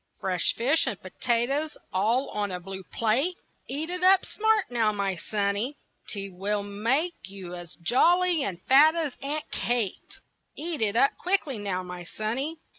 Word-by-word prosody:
Fresh 185 -3 0
fish 275 +6 +3
and 210 -7 -2
potatoes 250 +10 -1 0.2
all 225 +8 +2
on 205 -1 -2
a 180 -1 -3
blue 190 +2 -7
plate 265 +11 0 0.3
Eat 310 +5 -2
it 360 0 -3
up 380 0 +6
smart 435 - +1
now, 225 -3 +2
my 200 -2 -1
sonny. 205 +8 -1 0.3
'T 200 -2 -4
will 200 +3 -2
make 235 - 0
you 190 -2 -8
as 175 -1 -8
jolly 335 - +3
and 185 -7 -3
fat 300 +5 +6
as 315 -6 -1
Aunt 295 +2 -2
Kate 235 -5 -2 0.4
Eat 320 -2 -3
it 215 -1 +1
up 275 +4 +5
quick 385 +1 +1
now, 205 -9 -3
my 180 -1 -7
sonny. 240 - -3
230 Hz, 160 wpm, -27 LUFS, 200-305 Hz, 0.4 s, up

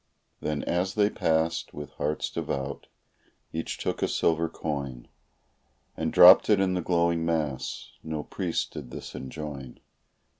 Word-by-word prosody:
Then 75 -1 -2
as 90 +2 -1
they 105 -1 +3
passed, 80 +1 0
with 75 -1 -7
hearts 75 +2 -2
devout, 70 0 -4 0.7
each 80 0 -3
took - - -3
a - - +2
silver 85 0 +1
coin 70 -7 -4 0.9
And 80 0 -2
dropped 90 +4 +9
it 105 -2 +5
in 95 -1 +2
the 90 - 0
glowing 85 -1 +1
mass 80 -5 -2
no 80 -1 -4
priest 90 0 -2
did 70 -5 -7
this 65 - -8
enjoin. 70 -1 -7
80 Hz, 140 wpm, -27 LUFS, 70-85 Hz, 0.9 s, dropped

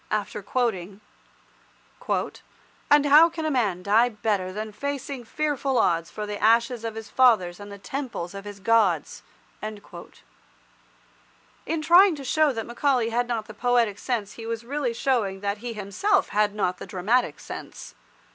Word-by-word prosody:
after 210 -1 -2
quoting— 200 -4 -2 1.9
"And 290 0 +5
how 300 +4 +7
can 315 -2 -3
man 200 -8 0
die 225 +5 +4
better 205 -4 -2
Than 215 +2 -5
facing 275 +2 -5
fearful 280 -1 -1
odds 165 -6 +1
For 210 - -5
the 210 0 -6
ashes 230 +2 +3
of 225 -1 -4
his 225 -1 -7
fathers 210 -9 +3
And 205 0 -10
the 200 - -8
Temples 230 -6 -5
of 200 0 -7
his 205 -1 -9
Gods?" 200 -6 +1 0.4
In 215 -1 -6 2.0
trying 350 +3 +6
to 280 - -8
show 305 +3 +2
that 225 -3 -4
Macaulay 240 -1 +1
had 240 +1 0
not 230 -3 -2
the 215 - -10
poetic 235 -2 +1
sense 220 -5 -2
he 225 -1 -9
was 230 0 -4
really 265 -2 -2
showing 220 -7 0
that 200 0 -2
he 240 +1 -5
himself 215 - 0
had 210 0 +1
not 185 -3 -1
the - - -8
dramatic 205 +7 0
sense. - - -9
225 Hz, 155 wpm, -25 LUFS, 205-255 Hz, 2.0 s, how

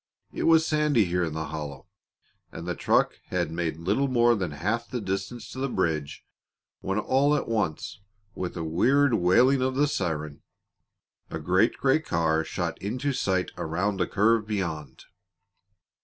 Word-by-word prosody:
It - - -2
was 160 -1 +5
sandy 150 -8 +2
here 90 0 0
in 80 -3 -2
the 80 -2 -4
hollow, 75 -1 -6 0.7
and 85 - -8
the 90 - -1
truck - - +1
had 85 -3 -1
made 80 -2 -2
little 100 +12 0
more 120 -2 +4
than 95 -6 -2
half 105 +11 -2
the 125 - -3
distance 105 +3 -4
to 130 - -7
the 135 +1 -1
bridge 80 - -2 0.5
when 95 +1 -2
all 135 +7 +2
at 150 - -2
once, 105 -10 -2 0.3
with 90 -1 -5
a 85 - -3
weird 130 - +3
wailing 120 +8 +4
of 130 0 0
the 145 +2 +3
siren, 75 - -3 0.9
a - - -4
great 90 +8 +2
gray 135 +3 +3
car 80 - 0
shot - - -4
into 125 +8 -2
sight 95 -6 0
around 95 +5 -1
a 90 - +1
curve 105 +1 +2
beyond. 80 -10 -4
95 Hz, 160 wpm, -26 LUFS, 80-125 Hz, 0.9 s, was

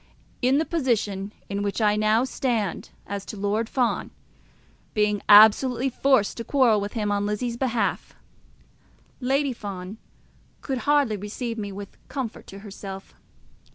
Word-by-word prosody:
In 260 +2 +3
the 315 - +1
position 210 - -1 0.2
in 200 0 -3
which 205 +1 -2
I 210 -2 +3
now 215 +2 +3
stand 235 -7 -2 0.2
as 200 -1 -5
to 210 - -8
Lord 210 +3 -1
Fawn, 250 -3 0 0.9
being 210 -1 +1
absolutely 230 +5 +7
forced 260 -5 +2
to 230 - -4
quarrel 235 -6 +3
with 205 +1 -4
him 210 -3 -1
on 205 0 0
Lizzie's 230 +3 -2
behalf, 235 -5 -1 1.0
Lady 270 +1 +1
Fawn 200 -2 -7 0.6
could 265 -2 -3
hardly 280 -8 +3
receive 225 +3 -5
me 205 -1 -4
with 200 0 -9
comfort 255 -5 -5
to 195 - -10
herself. 195 -1 -9
215 Hz, 140 wpm, -25 LUFS, 205-250 Hz, 1.0 s, absolutely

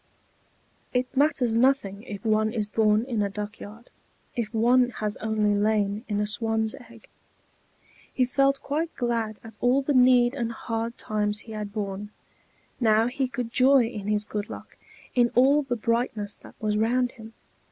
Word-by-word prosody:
It 250 +1 -1
matters 260 -5 +2
nothing 230 -5 +2
if 210 -2 -9
one 215 0 +2
is 215 -3 -2
born 215 +1 +3
in 235 -5 -1
a 200 - 0
duck 205 +1 -6
yard, 220 +4 -11 0.4
if 235 -3 -2
one 245 +2 +3
has 210 -1 -2
only 215 -1 0
lain 205 +1 0
in 205 -2 -1
a 210 - +1
swan's 220 +1 -1 0.2
egg. 230 -2 -16 1.0
He 255 - +1
felt 275 +1 +2
quite 315 +4 -2
glad 230 -3 -1
at 225 -2 -12
all 255 +3 +3
the 290 - 0
need 250 -1 +5
and 235 -4 -2
hard 230 0 -4
times 210 0 -1
he 225 - -12
had 210 -1 -5
borne; 205 -1 -4 0.7
now 220 -2 +4
he 265 +2 -1
could 245 -2 -5
joy 265 +1 +5
in 215 -3 -6
his 210 0 +1
good 210 0 -5
luck - - -10 0.4
in 240 -1 +3
all 275 +4 +5
the 260 -4 -2
brightness 225 -2 -1
that - - -15
was 210 -1 0
round 245 +2 +1
him. 225 -2 -13
225 Hz, 170 wpm, -26 LUFS, 210-250 Hz, 1.0 s, need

